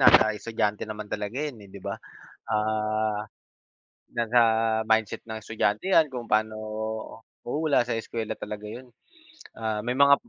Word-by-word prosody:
nasa 110 -1 +7
estudyante 105 -1 -1
naman 105 -1 -6
talaga 105 +2 -3
'yon, 145 -6 -4
eh, - - -14
'di 100 - -9
ba? - - -1 0.6
Ah, 110 0 +1 1.0
nasa 120 +1 +4 0.5
mindset 110 -1 +2
ng 110 -1 -5
estudyante 105 - 0
'yan 160 -2 +7
kung 120 -2 -4
paano 110 0 +3 0.9
oo, 120 - -2
wala 140 -5 +4
sa 120 - 0
eskuwela 110 -1 -3
talaga 105 0 -6
'yon, 125 +3 -8 0.7
ah, 110 -1 -1
may 125 - +1
mga 140 0 +8
110 Hz, 145 wpm, -27 LUFS, 105-120 Hz, 1.0 s, mga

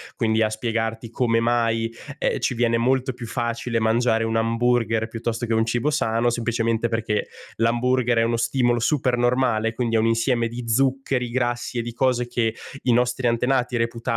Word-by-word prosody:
Quindi 110 -3 +1
a 110 - +3
spiegarti 115 0 -3
come 115 -2 +1
mai, 115 -1 +1 0.2
ehm, 140 - 0
ci 125 - 0
viene 115 -1 +1
molto 130 +2 +1
più 120 -1 -8
facile 115 0 -2
mangiare 115 0 +2
un 115 0 0
hamburger 115 -1 +1
piuttosto 115 +1 -3
che 115 - -1
un 110 0 +2
cibo 120 +5 0
sano 120 -5 +1
semplicemente 115 -1 0
perché 110 -2 -1 0.3
l'hamburger 120 +1 +2
è - - +3
uno 115 0 0
stimolo 120 0 +1
supernormale, 120 -3 +1
quindi 115 -1 0
è - - +3
un 110 - +2
insieme 115 +1 +1
di 120 +2 -6
zuccheri, 130 0 +1
grassi 120 0 -2
e - - +1
di 120 - -5
cose 125 0 0
che 115 -2 0 0.3
i 125 - +3
nostri 125 +1 +1
antenati 125 +1 +1
reputavano 115 0 -2
115 Hz, 175 wpm, -23 LUFS, 115-125 Hz, 0.3 s, a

